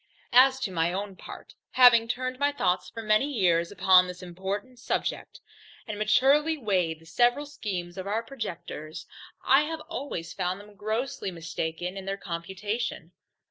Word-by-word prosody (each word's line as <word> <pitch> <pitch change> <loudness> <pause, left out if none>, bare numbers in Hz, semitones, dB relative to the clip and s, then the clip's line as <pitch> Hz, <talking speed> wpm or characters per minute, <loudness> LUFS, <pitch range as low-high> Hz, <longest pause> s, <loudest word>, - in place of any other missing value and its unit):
As 260 +2 +6
to 200 - -2
my 170 -1 +1
own 195 +1 -4
part, - - -11 0.2
having 245 -3 +7
turned 255 +1 -3
my 285 0 +2
thoughts 180 -9 0
for 225 - -7
many 215 +7 +2
years 175 -7 +2
upon 185 -2 +5
this 180 +1 -8
important 195 +8 -5
subject, - - -3 0.5
and 210 -2 -5
maturely 275 +9 +3
weighed 185 - 0
the - - -17
several 245 - +2
schemes 190 -10 -5
of 190 - -5
our 220 +3 -1
projectors, 180 - -7 0.4
I 270 +2 +6
have 320 0 -5
always 285 - -5
found 185 0 -2
them 205 +1 -14
grossly 220 +2 -3
mistaken 170 +1 -4
in 190 - -7
their 195 0 -3
computation. 190 +6 -4
205 Hz, 155 wpm, -27 LUFS, 180-250 Hz, 0.5 s, having